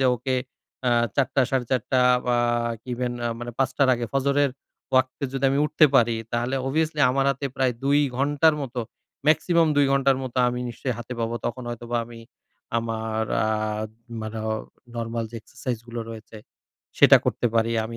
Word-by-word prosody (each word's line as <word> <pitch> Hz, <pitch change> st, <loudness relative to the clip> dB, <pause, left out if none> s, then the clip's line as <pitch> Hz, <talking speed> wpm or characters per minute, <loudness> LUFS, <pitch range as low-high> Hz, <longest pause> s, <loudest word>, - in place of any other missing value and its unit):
যে, 130 Hz, -, +4 dB
ওকে। 130 Hz, +2 st, -1 dB, 0.5 s
আ -, -, +3 dB, 0.3 s
৪ঃ০০ 135 Hz, -3 st, +3 dB
টা 135 Hz, -, +4 dB
৪ঃ৩০ 130 Hz, -2 st, 0 dB
টা 130 Hz, -, +4 dB, 0.3 s
বা 120 Hz, -1 st, +2 dB, 0.5 s
ইভেন 125 Hz, 0 st, -2 dB
আ -, -, 0 dB
মানে 120 Hz, 0 st, -5 dB
৫ঃ০০ 135 Hz, -, +2 dB
টার 140 Hz, -2 st, +3 dB
আগে, 120 Hz, -1 st, -3 dB
ফজরের 140 Hz, +1 st, +2 dB, 0.4 s
ওয়াক্তে 130 Hz, +2 st, +2 dB
যদি 135 Hz, 0 st, -2 dB
আমি 140 Hz, -, +1 dB
উঠতে 155 Hz, 0 st, +5 dB
পারি। 115 Hz, -1 st, +3 dB, 0.2 s
তাহলে 120 Hz, +3 st, 0 dB
অবভিয়াসলি 155 Hz, +2 st, 0 dB
আমার 135 Hz, +1 st, +1 dB
হাতে 140 Hz, +1 st, -2 dB
প্রায় 130 Hz, -2 st, +2 dB
২ 140 Hz, +1 st, +4 dB, 0.2 s
ঘন্টার 145 Hz, +3 st, +3 dB
মত, 130 Hz, -3 st, -6 dB, 0.5 s
মেক্সিমাম 165 Hz, +1 st, +4 dB
২ 145 Hz, -1 st, +5 dB
ঘন্টার 135 Hz, -1 st, +3 dB
মত 130 Hz, -1 st, -6 dB
আমি 125 Hz, 0 st, -3 dB
নিশ্চয়ই 125 Hz, +1 st, -3 dB
হাতে 120 Hz, +2 st, -7 dB
পাবো। 115 Hz, +1 st, -1 dB
তখন 125 Hz, +2 st, -4 dB
হয়তোবা 120 Hz, 0 st, -4 dB
আমি 115 Hz, 0 st, -11 dB, 0.6 s
আমার 110 Hz, -1 st, -2 dB, 0.2 s
আ -, -, +1 dB, 0.7 s
মানে 110 Hz, +1 st, -5 dB
অ -, -, +1 dB, 0.4 s
নরমাল 115 Hz, 0 st, -2 dB
যে -, -, -13 dB
এক্সারসাইজ 120 Hz, +2 st, -5 dB
গুলো 120 Hz, 0 st, -5 dB
রয়েছে, 110 Hz, 0 st, -10 dB, 0.6 s
সেটা -, -, +9 dB
করতে 120 Hz, -, 0 dB
পারি। 115 Hz, 0 st, +2 dB
আমি 115 Hz, +1 st, -6 dB
125 Hz, 175 wpm, -24 LUFS, 115-135 Hz, 0.7 s, সেটা